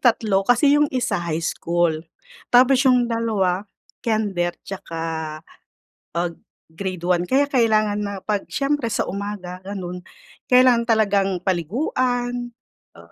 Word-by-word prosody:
3 220 -5 +3
kasi 260 +4 +5
'yong 295 0 +3
isa 255 -9 -1
high 165 -1 -2
school, 170 0 0 0.6
tapos 255 +2 +5
'yong 250 -1 +4
2 210 -5 0 0.3
kinder 200 -6 0
tsaka, 165 -4 -5 0.8
pag 170 0 0 0.4
grade 185 0 -5
1, 180 -1 +1
kaya 275 +2 +4
kailangan 215 -6 +2
na 200 -1 -3
'pag 205 -2 -1
siyempre 280 -3 0
sa - - 0
umaga 195 -2 -5
gano'n, 185 -2 -6 0.5
kailangan 250 -2 +5
talagang 200 -3 +3 0.2
paliguan, 245 - -1 0.5
ah, - - -16
205 Hz, 120 wpm, -22 LUFS, 180-245 Hz, 0.8 s, kasi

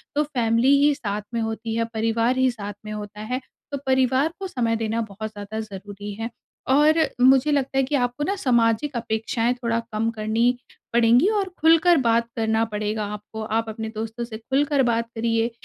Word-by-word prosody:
तो 300 - +3
फैमिली 245 -1 +2
ही 295 - +5
साथ 210 -6 -3
में 230 - 0
होती 225 0 -3
है, 230 0 +1
परिवार 230 +3 +1
ही 260 -1 +3
साथ 205 -3 -6
में 215 - -6
होता 210 0 -7
है, 250 +4 -3 0.3
तो 280 - -2
परिवार 260 +4 +2
को 390 - -4
समय 235 -9 0
देना 225 0 -1
बहुत 215 +2 -5
ज़्यादा 205 +1 -6
ज़रूरी 205 -1 -7
है। 230 - -2 0.4
और 300 +4 +5 0.2
मुझे 265 +3 +5
लगता 275 -2 0
है 270 - +4
कि 270 +3 -1
आपको 245 +2 0
ना 395 +6 0
सामाजिक 240 - +1
अपेक्षाएँ 225 +1 -1
थोड़ा 235 -2 -1
कम 220 +2 0
करनी 225 +3 +1 0.4
पड़ेंगी 235 +6 +5
और 385 -2 -1
खुलकर 330 +2 +5
बात 235 -3 +2
करना 220 0 +1
पड़ेगा 215 0 -3
आपको। 210 +1 -8 0.2
आप 225 - 0
अपने 220 0 -5
दोस्तों 225 +2 -4
से 220 -2 -7
खुलकर 275 +4 +1
बात 230 -1 +1
करिए। 230 0 +1
230 Hz, 185 wpm, -23 LUFS, 220-260 Hz, 0.4 s, ही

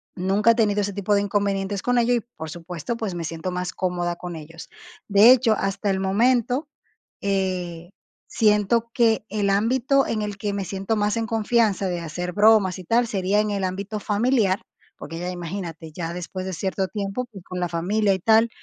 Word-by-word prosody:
nunca 195 +5 +3
he - - +1
tenido 210 -3 +2
ese 205 0 -2
tipo 200 +1 0
de 200 - +3
inconvenientes 200 -1 -1
con 245 0 +1
ello 240 +1 +2
y, 235 - +1 0.2
por 160 -1 -6
supuesto, 175 +5 -5
pues, 210 -6 -3
me 170 - -4
siento 165 +2 -4
más 180 0 -3
cómoda 175 -1 -1
con 175 -1 -7
ellos. 165 +1 -10 0.4
De 205 +4 +7
hecho, 235 -4 +4
hasta 195 +1 -1
el 190 -1 +1
momento, 245 +8 +1 0.5
eh, 185 -4 -2 0.4
siento 220 +1 +2
que 225 -2 +2
el 205 -1 0
ámbito 255 +7 +2
en 215 - -1
el 210 -1 -3
que 205 0 -2
me 200 -1 -3
siento 195 +4 -2
más 210 0 +1
en 225 -1 -1
confianza 220 -3 +1
de 175 -2 -2
hacer 175 +2 -4
bromas 210 -3 +4
y 185 - -8
tal, 235 +3 +2
sería 195 -1 +1
en 215 - -2
el 200 -1 -2
ámbito 200 +3 -3
familiar, 210 -2 +1 0.4
porque 165 - -8
ya, 180 - -3
imagínate, 170 -2 -6
ya 165 0 -4
después 180 +1 -5
de 190 - -3
cierto 190 +2 -2
tiempo, 205 +4 -3
y 195 - -9
con 180 0 -6
la 175 - -1
familia 195 +4 +1
y 190 - -2
tal. 225 +4 +4
200 Hz, 195 wpm, -23 LUFS, 180-220 Hz, 0.5 s, De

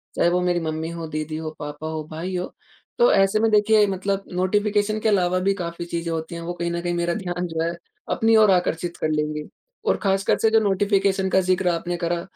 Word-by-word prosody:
चाहे 170 - +3
वो 180 +1 +1
मेरी 175 -1 +1
मम्मी 160 0 -3
हो, 165 -1 -6
दीदी 155 0 -4
हो, 160 -1 -5
पापा 150 +1 -6
हो, 160 -1 -4
भाई 175 +4 -4
हो, 180 +1 -4 0.5
तो 485 +1 +6
ऐसे 195 +2 +3
में 225 - +3
देखिए 210 0 +5
मतलब 195 +1 -2
नोटिफ़िकेशन 205 +3 +1
के 220 - +1
अलावा 185 -3 +2
भी 195 +2 +2
काफ़ी 170 -2 -5
चीज़ें 170 -1 -3
होती 160 +1 -4
हैं, 170 - -6
वो 175 +1 -4
कहीं 170 0 -3
न 170 - -2
कहीं 175 0 -2
मेरा 170 0 0
ध्यान 180 -3 -3
जो 160 -1 -3
है, 165 - 0 0.4
अपनी 225 0 +3
ओर 215 -2 +6
आकर्षित 175 -1 0
कर 155 - -1
लेंगी। 150 0 -2 0.4
और - - +3
खासकर 195 0 +2
से 225 - +3
जो 225 - +5
नोटिफ़िकेशन 195 -1 +1
का 190 - +3
ज़िक्र 185 0 +1
आपने 175 +1 -2
करा, 170 0 -1
180 Hz, 225 wpm, -23 LUFS, 165-195 Hz, 0.5 s, तो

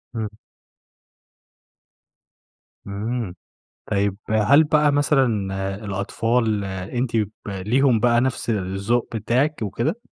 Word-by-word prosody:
إمم. 110 -2 -2 2.6
إمم. 105 0 -3 0.6
طيب، 100 -1 +1
هل 110 +8 +5
بقى 150 -1 +3
مثلًا 145 -1 +3 0.6
الأطفال 105 +2 0
أنتِ 100 +6 -3
ب 105 -2 +1 0.2
ليهم 115 +6 +2
بقى 120 +1 +3
نَفْس 130 -2 -1
الذوق 100 +4 -1
بتاعِك 125 +8 0
وكده؟ 115 - -2
115 Hz, 90 wpm, -22 LUFS, 100-130 Hz, 2.6 s, هل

